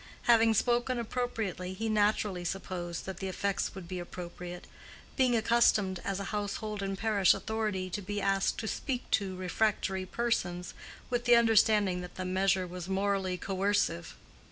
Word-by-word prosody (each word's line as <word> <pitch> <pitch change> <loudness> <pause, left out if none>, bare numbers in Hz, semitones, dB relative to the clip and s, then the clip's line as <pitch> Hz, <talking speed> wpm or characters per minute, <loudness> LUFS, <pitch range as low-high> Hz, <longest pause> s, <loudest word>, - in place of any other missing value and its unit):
Having 225 -1 +5
spoken 240 +3 +2
appropriately, 220 -6 -3
he 225 +4 -3
naturally 210 -3 +1
supposed 175 -2 -4
that 190 -2 -5
the 190 - -4
effects 195 +1 -1
would 190 -3 -8
be 180 0 -4
appropriate; 175 0 -7 0.5
being 255 -3 +3
accustomed, 220 -5 +3
as 195 -1 -2
a - - -3
household 210 0 -3
and 195 0 -2
parish 205 -3 +4
authority, 215 -4 -2
to 205 - -3
be 205 +2 -3
asked 195 -1 +1
to 220 - -4
"speak 255 +2 -2
to" 195 -3 +1
refractory 190 0 0
persons, 180 -6 -1 0.4
with 240 -1 0
the 240 0 +7
understanding 215 -5 +4
that 180 - -9
the 185 - -4
measure 190 0 +2
was 180 0 -7
morally 195 -1 0
coercive. 195 -3 0
195 Hz, 155 wpm, -31 LUFS, 185-220 Hz, 0.5 s, the